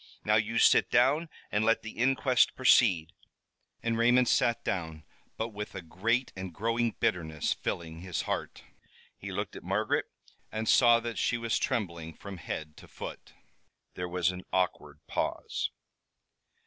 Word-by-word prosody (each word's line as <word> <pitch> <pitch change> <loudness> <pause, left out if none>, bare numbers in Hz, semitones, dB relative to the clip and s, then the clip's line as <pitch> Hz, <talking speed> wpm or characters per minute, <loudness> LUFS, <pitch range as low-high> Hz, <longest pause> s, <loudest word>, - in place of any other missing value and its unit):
Now, 105 - +3
you 110 +2 +2
sit - - +5
down, 150 +7 +3 0.2
and 105 +1 +1
let 115 +1 +2
the 110 - -6
inquest 130 +1 +2
proceed." 95 -11 +4 0.7
And 115 -1 0
Raymond 125 +1 +5
sat 120 0 +2
down, 80 -4 -3 0.3
but 110 +1 -2
with 105 -2 -7
a 95 - -6
great 115 +10 -1
and 95 -1 -6
growing 115 +5 0
bitterness 80 -4 0
filling 80 -1 -5
his 90 -2 -3
heart. - - -4 0.5
He - - -8
looked - - -4
at - - -9
Margaret - - 0 0.5
and 110 +1 -3
saw 120 -2 +6
that 115 -1 -4
she 120 - +1
was 115 -1 0
trembling 85 -7 -2
from 100 -2 -9
head 80 -2 -6
to - - -13
foot. - - -9 0.6
There 90 0 -4
was 90 0 +1
an 90 0 -8
awkward 75 -5 -1
pause. - - -2
105 Hz, 150 wpm, -30 LUFS, 85-115 Hz, 0.7 s, saw